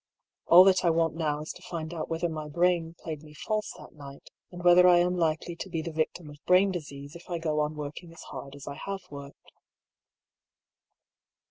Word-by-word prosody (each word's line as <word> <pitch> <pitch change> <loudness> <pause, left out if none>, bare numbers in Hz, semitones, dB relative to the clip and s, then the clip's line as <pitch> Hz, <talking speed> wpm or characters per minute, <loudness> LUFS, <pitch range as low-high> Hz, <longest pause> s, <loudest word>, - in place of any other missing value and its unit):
All 175 +2 +9
that 190 -1 +4
I 175 - +4
want 165 -1 +2
now 150 -2 -2
is 155 - -5
to - - -13
find 165 -2 -6
out 160 - -5
whether 165 +1 -1
my 155 -2 -5
brain 170 +1 +1
played 155 -3 -6
me 150 -1 -15
false 215 +5 -2
that - - -13
night, 140 -2 -12 0.2
and 175 -1 -9
whether 180 +1 +7
I 175 -1 +7
am 180 +1 +2
likely 165 0 -1
to 190 - -6
be 165 -3 -3
the 165 - -5
victim 160 +1 -2
of 145 -1 -16
brain 185 +2 +5
disease 145 -4 -7
if 170 - -13
I 175 - -2
go 155 -2 -1
on 150 +1 -1
working 150 +3 -7
as 165 - -12
hard 140 0 -8
as 140 - -11
I 140 - -6
have 195 -1 -3
worked. 140 0 -11
165 Hz, 210 wpm, -28 LUFS, 150-175 Hz, 0.2 s, All